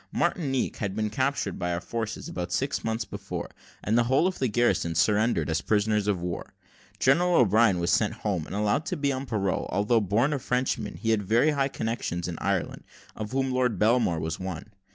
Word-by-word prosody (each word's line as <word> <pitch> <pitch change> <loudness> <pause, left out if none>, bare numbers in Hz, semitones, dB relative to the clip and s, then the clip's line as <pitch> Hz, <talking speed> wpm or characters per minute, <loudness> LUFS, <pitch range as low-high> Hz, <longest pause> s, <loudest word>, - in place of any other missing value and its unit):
Martinique 135 -7 0
had 100 -2 -3
been 110 -1 -1
captured 130 -5 -1
by 90 -1 -1
our 85 - -1
forces 115 +4 -4
about 90 -1 -5
six 135 +9 -1
months 115 0 -1
before, 100 -1 -6 0.3
and 105 - +1
the 120 0 +4
whole 135 +7 +3
of 185 0 -1
the 130 - +1
garrison 105 -7 +1
surrendered 105 -2 +2
as 80 0 0
prisoners 105 -1 +1
of 100 -3 +1
war. 85 0 -5 0.4
General 175 +7 +3
O'Brien 110 - +4
was 85 0 0
sent - - +2
home, 90 -7 -1
and - - -6
allowed 105 +8 +1
to 180 -3 -2
be 140 -1 +1
on 130 0 -4
parole; 100 -5 -1
although 110 +3 +2
born 110 +9 +1
a 145 - -1
Frenchman, 125 +1 -1
he 115 - -1
had 110 -2 +2
very 115 +10 +3
high 140 -2 +1
connections 110 -9 -3
in 85 -2 -5
Ireland, 100 -3 -2 0.3
of 110 0 -5
whom 135 0 0
Lord 125 -3 +1
Belmore 110 -6 +2
was 80 +1 -3
one. 95 +2 -6
110 Hz, 200 wpm, -27 LUFS, 95-130 Hz, 0.4 s, the